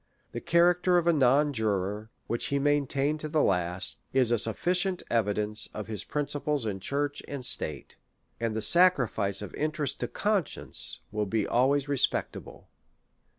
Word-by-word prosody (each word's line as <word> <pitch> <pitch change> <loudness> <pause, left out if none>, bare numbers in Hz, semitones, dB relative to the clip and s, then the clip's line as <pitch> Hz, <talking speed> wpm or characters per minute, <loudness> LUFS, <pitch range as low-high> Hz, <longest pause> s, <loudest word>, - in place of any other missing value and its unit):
The - - -6
charac 175 +1 +3
ter 180 -1 +3
of 175 - +1
a 170 - +3
non 145 +1 +3
juror, 105 -1 -2 0.2
which 115 - -2
he 140 - -1
maintained 145 +1 0
to 155 - -4
the 150 -1 +1
last, 90 0 -1
is 130 -3 +2
a 120 - +3
sufficient 180 - +1
evidence 105 -1 -1
of 105 - -5
his 110 -2 -3
principles 145 -2 -2
in 100 -3 -3
church 145 +7 -2
and 140 -3 -5
state, 75 - +2 0.4
and 115 -2 -2
the 110 - -2
sacrifice 115 - +3
of 100 - -9
interest 150 -2 -2
to 120 - -2
conscience 205 - -2
will 105 -1 -2
be 110 +1 -1
always 135 +3 +1
respectable. 140 -3 -1
135 Hz, 155 wpm, -27 LUFS, 105-150 Hz, 0.4 s, charac